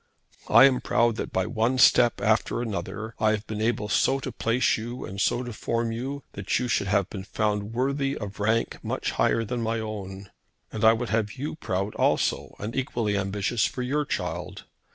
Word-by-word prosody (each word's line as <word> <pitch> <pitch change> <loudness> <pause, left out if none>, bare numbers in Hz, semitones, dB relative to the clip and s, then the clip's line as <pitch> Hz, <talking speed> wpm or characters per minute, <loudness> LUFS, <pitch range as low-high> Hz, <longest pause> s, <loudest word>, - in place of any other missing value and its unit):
I 135 - +8
am 130 -2 +3
proud 120 -1 +2
that - - -4
by 95 0 0
one 120 +2 0
step 120 -2 +5
after 110 +2 +1
another 110 -1 -4
I 110 - +3
have 110 0 -3
been 110 0 -4
able 110 -2 0
so 135 +6 +2
to 130 - -4
place 115 +2 +1
you 120 +2 -5
and 100 +1 -5
so 120 - +1
to 120 -2 -6
form 115 +1 -1
you 135 +5 -4
that 100 -1 -1
you 125 - -1
should 100 -4 0
have 100 -1 +2
been 95 -2 -7
found 105 +2 -2
worthy 140 +2 0
of 100 -1 -7
rank 110 +3 0
much - - -2
higher 115 - +2
than 120 +2 -3
my 115 0 -1
own. 100 -3 -6 0.4
And 110 - -4
I 110 0 +8
would 115 +1 -3
have 110 -1 0
you 140 +3 -4
proud 100 -7 -2
also - - 0
and 105 +3 -5
equally 120 -5 -1
ambitious 100 +3 0
for 125 - -5
your 145 +4 0
child. - - -4
110 Hz, 195 wpm, -26 LUFS, 105-125 Hz, 0.4 s, I